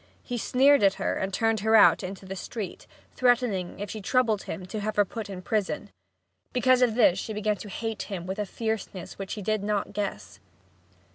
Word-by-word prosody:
He 245 -2 -4
sneered 275 +4 +4
at 195 -1 +4
her - - -1
and 190 - -2
turned 225 +2 +1
her 220 +2 +3
out 220 - +7
into 190 0 -7
the 190 +1 -6
street, 200 +2 -6 0.3
threatening 240 -9 +1
if 205 - -4
she 215 - -6
troubled 220 0 +2
him 185 - -6
to 210 +4 -5
have 215 +1 -3
her 205 - +4
put 220 +1 -6
into 185 -2 -7
prison. 190 - -2 0.6
Because 255 +1 +4
of 240 -3 +3
this 190 -6 +4
she 220 - -4
began 210 0 0
to 205 - -9
hate 225 +2 -4
him 185 -4 -5
with 190 +2 -4
a 210 - -1
fierceness 220 -6 -4
which 195 -1 -4
he 210 - -6
did 215 +1 0
not 205 -1 -1
guess. 100 - -4
210 Hz, 205 wpm, -27 LUFS, 190-225 Hz, 0.6 s, out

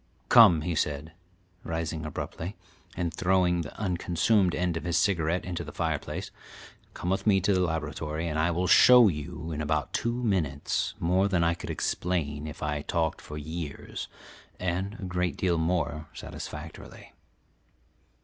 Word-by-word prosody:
"Come," 80 -3 +8
he 85 +2 -2
said, 75 0 -2 0.5
rising 80 -1 -3
abruptly, 80 +5 -5 0.4
and 85 -2 -1
throwing 90 -1 +2
the 75 - -8
unconsumed 90 0 +2
end 90 -2 0
of 80 - -3
his 85 -2 0
cigarette 85 -1 +1
into 85 -2 -3
the 75 - -8
fireplace. 80 -3 -3 0.6
"Come 90 - -2
with 95 +2 -1
me 100 -2 +5
to 100 +2 +2
the 95 - +2
laboratory, 80 -1 -2
and 80 -1 -1
I 80 +2 +3
will 90 +2 0
show 125 +3 +8
you 75 0 -5
in 75 -1 -3
about 75 0 -1
two 120 +1 -1
minutes 80 - 0
more 90 +4 +2
than 90 -4 +1
I 85 0 +3
could 85 - -8
explain 75 -4 -2
if 75 +1 -8
I 75 -1 -1
talked 80 +1 -1
for 75 - -8
years, 80 -1 -6 0.5
and 95 +3 -2
a - - -9
great 90 -1 -1
deal 85 -3 +1
more 80 -3 -1
satisfactorily." - - -9
85 Hz, 155 wpm, -28 LUFS, 80-90 Hz, 0.6 s, Come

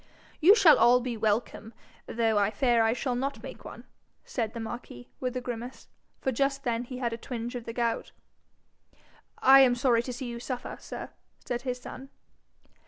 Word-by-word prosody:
'You 370 +6 +7
shall 380 -8 +7
all 245 +1 +6
be 245 -1 -4
welcome, 220 +1 -2 0.3
though 225 -2 +1
I 200 0 +2
fear 235 +2 +2
I 225 0 +3
shall 250 +2 -2
not 270 +3 -3
make - - -9
one,' - - -10 0.4
said 225 -2 -3
the - - -4
marquis, 225 - -8
with 255 -1 -3
a - - -3
grimace, 245 +1 -7 0.3
for 265 - -1
just 275 +2 0
then 240 -1 -1
he 255 +1 -7
had 240 -2 -2
a - - -4
twinge 240 -1 -5
of 245 -2 -6
the 230 - -6
gout. 235 -1 -1 1.3
'I 270 +1 +9
am 255 -2 +6
sorry 245 -2 +3
to 250 - -6
see 250 +2 -6
you 235 -1 -5
suffer, 250 0 -5
sir,' - - -8 0.3
said 245 -1 -3
his 250 -1 -3
son. 265 +2 -10
245 Hz, 185 wpm, -28 LUFS, 230-255 Hz, 1.3 s, I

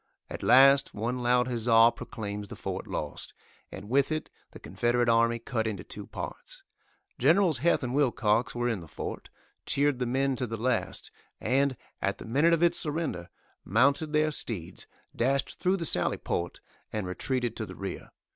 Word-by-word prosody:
At - - -6
last 135 +2 +6
one 120 +4 -2
loud 125 0 +2
huzza 115 -1 +5
proclaims 105 -3 -6
the - - -9
fort - - -5
lost, 75 -2 -5 0.4
and 100 +1 -9
with 135 +5 +2
it 155 0 -3 0.2
the - - -13
Confederate 120 0 0
army 115 0 +3
cut 115 -1 -2
into 100 -5 -4
two - - -7
parts. - - -7 0.6
Generals 160 +1 +4
Heth 170 0 +2
and 125 0 -3
Wilcox 120 -5 +1
were 120 0 0
in 115 -5 -1
the 85 - -11
fort, - - -7 0.4
cheered 145 -2 +2
the 125 - -1
men 135 +2 +1
to 125 - -2
the 115 0 -4
last, 125 +3 -2 0.3
and, 135 +2 +1 0.2
at 100 0 0
the - - -10
minute 145 +9 +3
of 170 0 +2
its 170 0 +3
surrender, 150 - -3 0.3
mounted 140 - +2
their 155 0 +2
steeds, 100 - -5 0.3
dashed 135 +3 0
through 185 +2 +2
the 170 - -3
sally - - +1
port 85 0 -3 0.3
and 105 -3 -3
retreated 120 +5 -2
to 110 - -4
the - - -9
rear. 95 -2 -6
125 Hz, 175 wpm, -28 LUFS, 110-140 Hz, 0.6 s, last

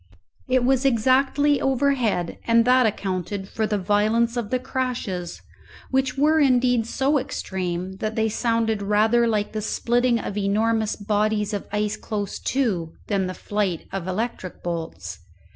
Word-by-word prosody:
It 255 -1 +3
was 265 0 +2
exactly 270 +3 +3
overhead, 260 -9 0
and 230 0 +4
that 250 -1 +5
accounted 190 -1 -3
for 220 +1 -2
the 210 - 0
violence 215 +4 +1
of 235 -4 -3
the 255 - +1
crashes, 240 -9 -4 0.5
which 265 0 0
were 305 +3 +4
indeed 250 -4 +3
so 275 +4 +1
extreme 185 -6 -4
that 215 +2 -3
they 220 0 +1
sounded 225 -1 0
rather 220 +4 +3
like 210 -2 0
the 215 - -3
splitting 240 +3 +1
of 205 -2 -4
enormous 215 +2 +1
bodies 210 0 0
of 205 - -4
ice 210 0 -1
close 205 -3 -4
to, 195 -12 -1 0.2
than 195 -3 +1
the 185 - -5
flight 200 -5 -2
of 190 -2 -4
electric 190 -1 -4
bolts. 160 - -5
220 Hz, 145 wpm, -23 LUFS, 200-250 Hz, 0.5 s, that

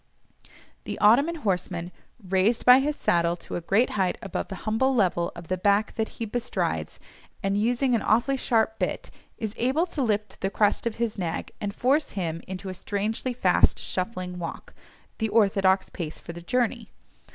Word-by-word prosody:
The - - -4
Ottoman 280 +11 +5
horseman, 180 -2 -1 0.4
raised 195 +5 +2
by 250 +1 +9
his 295 +2 0
saddle 170 -6 +2
to - - -8
a - - -2
great 200 +8 +2
height 190 -3 0
above 195 -6 -4
the 195 - -6
humble 260 +5 +2
level 180 -6 +1
of 170 -1 -10
the 185 +1 -2
back 205 +2 +2
that 220 -1 -2
he 230 - -2
bestrides, 240 +3 -2 0.4
and 195 0 +1
using 245 +5 +1
an 230 - +2
awfully 240 +5 +2
sharp 225 -3 +1
bit, - - -2 0.3
is 220 -3 -4
able 265 +8 +2
to 330 -5 -4
lift 210 -4 -1
the 195 - 0
crest 210 +2 +1
of 225 - -3
his 230 -3 -2
nag, 170 -3 -3
and 205 0 -3
force 280 +5 +1
him 165 -3 -2
into 190 +1 -6
a - - -4
strangely 210 +6 -2
fast 245 - +3
shuffling 185 -2 -4
walk, 165 - -7 0.5
the 220 -1 0
orthodox 195 -3 +3
pace 160 -4 -5
for 170 - -9
the 170 - -9
journey. 235 +3 -1
210 Hz, 175 wpm, -26 LUFS, 185-235 Hz, 0.5 s, by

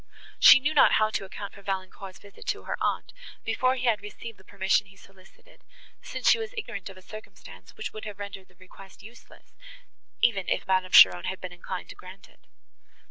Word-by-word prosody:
She - - +9
knew 295 +3 -1
not 295 - +5
how 215 0 +3
to 195 - -3
account 200 +1 -8
for 200 - -14
Valancourt's 190 -1 -6
visit 200 -1 -16
to - - -2
her - - -3
aunt, - - -2 0.3
before 255 0 +1
he 255 -1 -4
had 220 -4 +2
received 210 +2 -10
the - - -18
permission 190 0 0
he 195 - -18
solicited, 190 -1 -21 0.4
since - - -5
she - - +6
was 450 +2 -6
ignorant 200 - -6
of 195 - -13
a 185 - -16
circumstance, 215 +2 -13
which - - -6
would 215 - -8
have 210 -2 -8
rendered 200 -2 -8
the 180 - -27
request 185 +1 -16
useless, 230 +2 -17 0.7
even 200 -6 +1
if - - -1
Madame 185 -1 0
Cheron 90 -1 +8
had 190 - -4
been 185 -1 -8
inclined 180 +1 -7
to - - -10
grant 190 +2 -13
it. - - -28
195 Hz, 200 wpm, -26 LUFS, 190-215 Hz, 0.7 s, She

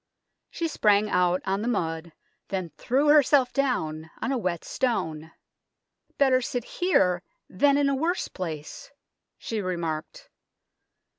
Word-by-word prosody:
She 335 - -2
sprang 210 -7 +2
out 180 0 +2
on 195 +1 0
the 225 - -2
mud, 165 -7 -2 0.4
then 185 -4 -3
threw 275 - +1
herself 285 -3 +5
down 160 - -1
on - - -2
a 270 - +1
wet 180 -5 -2
stone. 160 -11 -2 0.4
" - - -46
Better 260 -2 +4
sit 245 -1 -3
here 180 - +1 0.3
than 280 +9 +3
in 285 -1 +3
a 275 - +2
worse 325 +7 0
place," 160 -5 -7 0.5
she 220 -2 -4
remarked. 175 - -4
210 Hz, 135 wpm, -26 LUFS, 170-275 Hz, 0.5 s, herself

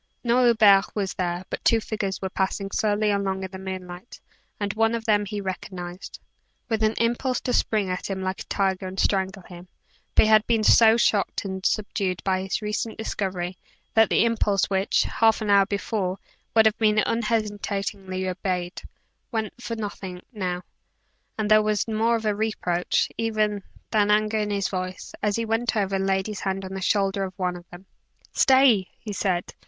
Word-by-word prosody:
No 245 +1 +3
Hubert 210 -4 +5
was 200 -3 -1
there, 175 0 -3
but - - -4
two 230 - +4
figures 210 -3 -3
were 190 - -3
passing 195 +1 -2
slowly 210 0 +1
along 195 -1 -1
in 190 - -6
the 190 - -8
moonlight, 185 +2 -8 0.4
and 200 -1 -2
one 225 +1 +2
of 225 -1 -5
them 210 -2 +2
he 205 +1 -4
recognized, 185 -2 -6 0.5
with 220 -1 0
an 220 0 +2
impulse 240 +2 0
to 250 - -2
spring 215 -5 +1
at 185 +1 -3
him 190 -1 -3
like 185 +1 -3
a - - -7
tiger 190 -1 -1
and 185 +1 -6
strangle 190 -1 0
him. 175 0 -12 0.5
But - - +7
he - - +2
had 215 0 +5
been 225 -2 +2
so 225 +1 +6
shocked 205 -3 +1
and 190 -1 -5
subdued 195 -3 -1
by 190 -1 +1
his 195 +3 -3
recent 210 +1 -3
discovery, 185 -4 -3 0.3
that 225 -1 +5
the - - +3
impulse 205 -4 +1
which, 190 +1 +2
half 225 -1 +2
an 215 -2 -1
hour 200 -1 +5
before, 200 -2 -2 0.4
would 220 -1 +6
have 220 -1 +2
been 215 -1 +3
unhesitatingly 205 -4 -1
obeyed, 180 -1 -3 0.5
went 220 -3 -2
for 230 -1 -4
nothing, 195 -4 -6
now; 180 -4 -3 0.7
and 215 -1 -1
there 215 0 +7
was 215 0 0
more 225 +1 +1
of 225 -1 -3
reproach, 205 -4 0
even, 215 -2 0 0.3
than 210 -1 +3
anger 215 +1 +2
in 210 -1 -1
his 200 -1 0
voice, 185 -1 -5
as 205 -1 +1
he 230 - -1
went 225 +1 0
over 195 -1 0
and 195 0 -1
laid 190 0 +1
his 210 -2 -5
hand 195 0 -3
on 190 - -7
the 190 - -5
shoulder 195 0 +1
of 185 -1 -6
one 180 -1 -1
of 175 0 -12
them. 175 +2 -12 0.5
"Stay!" 260 -8 +5
he 210 -2 -7
said. 185 -3 -1
200 Hz, 185 wpm, -25 LUFS, 190-220 Hz, 0.7 s, But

